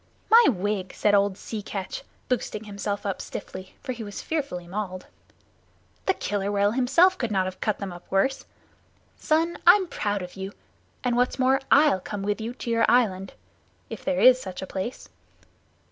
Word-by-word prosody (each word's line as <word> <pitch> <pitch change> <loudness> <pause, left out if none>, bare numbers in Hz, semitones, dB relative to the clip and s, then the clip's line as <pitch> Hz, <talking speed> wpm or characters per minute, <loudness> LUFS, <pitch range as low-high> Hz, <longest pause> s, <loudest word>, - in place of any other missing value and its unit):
"My 465 +1 +8
wig!" 200 -3 -2
said 205 - +2
old 200 -1 +3
Sea 220 0 -6
Catch, 195 -2 -5 0.3
boosting 225 -3 -2
himself 205 -1 -4
up 195 -2 -2
stiffly, 185 0 -8
for 255 - -3
he 240 -2 -6
was 205 -1 -7
fearfully 275 - -3
mauled. 185 -1 -5 1.0
"The 380 - +3
Killer 200 0 -2
Whale 205 0 +2
himself 270 - +4
could 235 - -1
not 190 -3 +1
have 185 0 -6
cut 215 -2 0
them 195 -3 -5
up 175 - -13
worse. 230 +8 +1 0.7
Son, 325 +2 0
I'm 375 +2 +8
proud 205 - -2
of 180 - -9
you, 195 +1 -6 0.5
and 245 -2 +1
what's 245 +1 +1
more, 265 +1 +3
I'll 285 -8 +5
come 200 +2 -6
with 205 +2 -1
you 235 +3 -5
to 240 - -5
your 230 0 +3
island 195 -6 +2 0.6
if - - -7
there 280 -1 0
is 255 0 +7
such 185 -3 -6
a - - -3
place." 190 +6 -5
210 Hz, 175 wpm, -25 LUFS, 195-255 Hz, 1.0 s, My